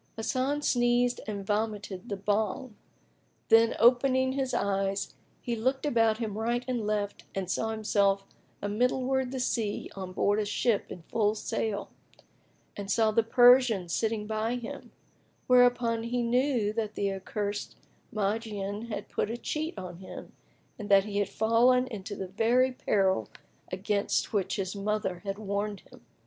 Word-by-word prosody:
Hasan 260 +6 -1
sneezed 245 -1 +2
and 200 -2 -4
vomited 210 -1 -2
the 200 - -2
Bhang; 210 +4 -1 0.8
then, 225 0 +5
opening 260 +2 +4
his 265 -1 -1
eyes, 195 -3 -1 0.3
he 240 - -1
looked 260 +5 0
about 225 -5 +3
him 220 -3 -4
right 240 +2 -1
and 240 -4 -2
left 205 -1 -2
and 190 -2 -2
found 225 0 -1
himself 200 -2 +1 0.4
amiddleward 250 +5 +1
the 260 0 -4
sea 225 -4 -2
on 190 -1 -5
aboard 205 +3 +1
a 210 - 0
ship 210 +1 +1
in 175 - -8
full 210 +3 +1
sail, 210 -1 -3 0.8
and 200 -1 -6
saw 220 0 +3
the 230 - +3
Persian 245 -4 +5
sitting 220 +3 -1
by 220 +2 -1
him; 240 -2 -7 0.6
wherefore 245 -2 +4
he 240 +1 -1
knew 240 -3 +1
that 215 -2 -3
the 200 -1 0
accursed 205 +2 -4 0.4
Magian 210 0 -2
had 210 -3 -5
put - - -2
a 230 - -3
cheat 310 +2 -3
on 180 -2 -7
him 185 - -10 0.5
and 210 - -6
that 195 -1 +6
he 205 0 -2
had 200 -1 0
fallen 240 +3 +3
into 210 -4 -6
the 190 -1 -5
very 240 +6 +3
peril 190 - +1 0.4
against 200 +4 -1
which 195 -2 0
his 190 0 -3
mother 205 -2 -2
had 195 0 -3
warned 205 -1 -3
him. - - -18
215 Hz, 150 wpm, -29 LUFS, 200-240 Hz, 0.8 s, that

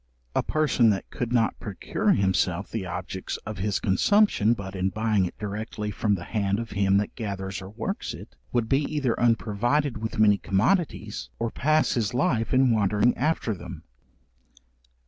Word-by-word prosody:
A - - +3
person 150 -7 +2
that 100 -2 -1
could 120 -1 -3
not 115 -2 +1
procure 100 -3 0
himself 95 -1 0
the 105 -5 -3
objects 95 +1 -5
of 110 -2 -6
his 100 0 0
consumption 115 - +3
but 100 -2 -7
in 95 0 0
buying 110 -2 +1
it - - -11
directly 105 0 -4
from 105 0 +1
the 85 - -6
hand 100 0 -1
of 115 0 -5
him 100 -1 +2
that 105 - -1
gathers 95 -3 -4
or 95 - -8
works 110 +2 -4
it, - - -12 0.2
would 120 -2 0
be 135 +4 +2
either 140 -6 0
unprovided 120 +3 +1
with 110 +1 -4
many 105 -2 +5
commodities, 110 - 0
or 115 -1 -2
pass 155 +2 +2
his 115 -2 -1
life 115 -2 +1
in 130 -1 +4
wandering 105 +2 +2
after 150 -7 0
them. 95 - -9
110 Hz, 165 wpm, -26 LUFS, 100-120 Hz, 0.2 s, many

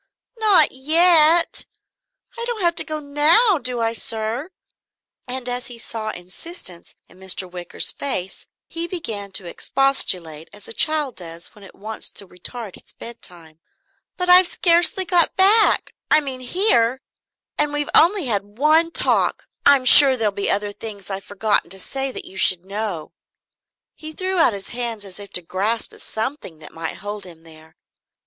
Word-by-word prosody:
"Not 425 -4 +4
yet? 325 +4 +3 0.7
I 470 - -4
don't 475 -3 -4
have 340 -1 +2
to - - +5
go 310 -1 -4
now, 305 +8 +3
do 250 -3 -2
I, 225 0 0
sir?" 230 +6 -3 0.8
And 250 0 -4
as 245 0 -4
he 245 - -11
saw 225 -1 -6
insistence 185 - -8
in 180 - -21
Mr. 190 0 0
Wicker's 180 -1 -4
face 195 -10 -2 0.2
he 335 0 -3
began 220 - -6
to 190 - -1
expostulate 175 - 0
as 205 0 -12
a - - -5
child 300 -2 0
does 170 -1 -8
when 210 - -17
it 195 - -15
wants 215 +2 -7
to 200 - -1
retard 200 +4 -8
its - - -18
bedtime. 175 -9 -9 0.6
"But 360 -1 -2
I've 360 0 +7
scarcely 350 +2 +4
got 345 -2 +2
back 415 +3 +4 0.2
I - - +6
mean, 270 -3 -6
here. 255 - +1 0.6
And 295 0 +2
we've 295 0 -3
only 355 0 +4
had 205 -3 -4
one 310 +4 +3
talk - - 0 0.2
I'm 280 -2 +5
sure 265 +1 +8
there'll 220 -3 0
be 200 0 -3
other 205 0 -1
things 205 -2 -9
I've 195 0 -6
forgotten 205 -1 -1
to 190 +2 -6
say 270 +6 -3
that - - -8
you 190 - -12
should 185 -1 +4
know 195 -5 -5 0.4
" - - -65
He 310 0 -10
threw 370 +2 -1
out 325 - +4
his 195 -1 -7
hands 235 -4 -4
as 190 0 -10
if 200 -1 -11
to 180 - +1
grasp 205 +7 -3
at - - -15
something 220 - -5
that 155 -1 -14
might 165 0 -6
hold 205 0 -6
him 165 -3 -13
there. 160 -1 -17
230 Hz, 170 wpm, -20 LUFS, 195-310 Hz, 0.8 s, sure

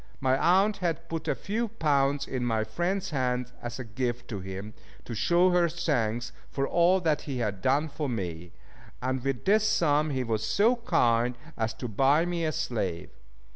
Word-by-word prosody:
My 130 -1 +2
aunt 190 +8 +3
had 170 -3 -2
put 165 -1 -4
a - - +1
few 225 +4 -2
pounds 145 -9 +1
in 130 -2 -3
my 115 -2 +1
friend's 180 - -2
hands 125 -3 -1
as 120 -1 -5
a 130 - -5
gift 120 +3 -3
to 105 - -4
him, 95 +3 -7 0.3
to 120 - -6
show 175 +11 +3
her 175 -1 +3
thanks 120 -9 -1 0.2
for 135 0 -1
all 175 +2 +4
that 155 -3 +1
he 135 - -2
had 105 -5 -2
done 140 +7 +2
for 150 -1 -4
me, 90 -7 -4 0.5
and 130 0 -2
with 135 -3 -2
this 210 +2 +4
sum 155 -7 +2
he 130 -3 -1
was 110 -2 -1
so 220 - +3
kind 120 - +2 0.2
as 110 -1 -2
to 125 - -5
buy 135 +9 +3
me 175 -1 -2
a 155 - +1
slave. 110 - -3
135 Hz, 185 wpm, -28 LUFS, 120-170 Hz, 0.5 s, all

